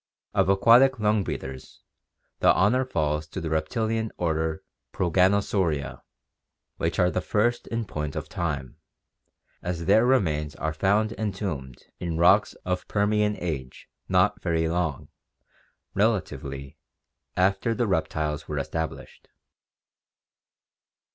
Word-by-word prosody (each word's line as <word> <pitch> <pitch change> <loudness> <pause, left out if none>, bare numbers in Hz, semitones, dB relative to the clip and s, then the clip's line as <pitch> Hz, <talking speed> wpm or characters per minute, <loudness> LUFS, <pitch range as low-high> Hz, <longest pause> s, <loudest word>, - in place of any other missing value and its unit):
Of - - +2
aquatic 120 +6 +5
lung 105 -1 +2
breathers, 65 -6 -7 0.6
the - - +6
honor 120 +7 +3
falls 75 -9 -1
to 85 - -6
the 80 -3 -4
reptilian 110 +8 -1
order 80 -2 -1 0.3
Proganosauria, 90 -4 +1 0.8
which - - -1
are 90 0 +3
the 90 - -1
first 120 +5 0
in 115 -1 -2
point 75 -6 -4
of - - -4
time, 75 -7 -4 0.8
as 85 -1 -3
their 110 - +5
remains 80 - +1
are 80 0 -2
found 105 +6 +1
en 110 -2 0
tombed 75 - -5 0.2
in 85 -2 -3
rocks 85 +1 +4
of 90 0 -2
Permian 105 0 +1
age 70 -7 -5 0.2
not 100 +3 +3
very 80 -2 0
long, 80 -3 -2 0.8
relatively, 70 0 -1 0.6
after 95 +5 +2
the 120 - +1
reptiles 80 -5 -1
were - - -3
established. 80 -1 -5
90 Hz, 115 wpm, -26 LUFS, 80-105 Hz, 0.8 s, the